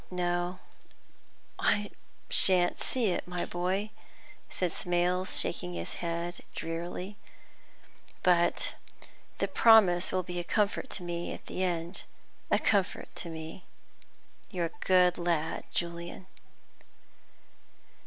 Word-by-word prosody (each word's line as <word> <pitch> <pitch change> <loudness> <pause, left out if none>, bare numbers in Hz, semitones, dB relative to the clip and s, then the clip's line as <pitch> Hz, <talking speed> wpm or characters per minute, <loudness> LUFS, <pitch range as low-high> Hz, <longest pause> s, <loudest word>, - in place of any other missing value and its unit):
"No, 175 0 -1 1.0
I 205 0 +2 0.4
sha'n't 180 -2 +4
see 240 -5 +1
it, - - -2
my 180 -1 -2
boy," 190 +4 -1 0.6
said 180 -2 -1
Smales, 180 +2 +1
shaking 90 - -1
his 85 0 -4
head 170 +1 -3 0.2
drearily; 175 +4 -4 1.1
"but 175 -1 +3 0.6
the - - 0
promise 195 -6 +6
will 185 0 0
be 175 0 -4
a - - -2
comfort 210 +6 0
to 185 - -4
me 175 0 -3
at - - -14
the 185 - -2
end, 175 0 -2 0.4
a - - +4
comfort 200 -2 0
to 170 - -4
me. 160 +2 -7 0.9
You're 170 -4 -2
a - - -10
good 180 -1 +5
lad, 170 -2 0
Julian!" 170 +1 -4
175 Hz, 115 wpm, -30 LUFS, 170-185 Hz, 1.1 s, promise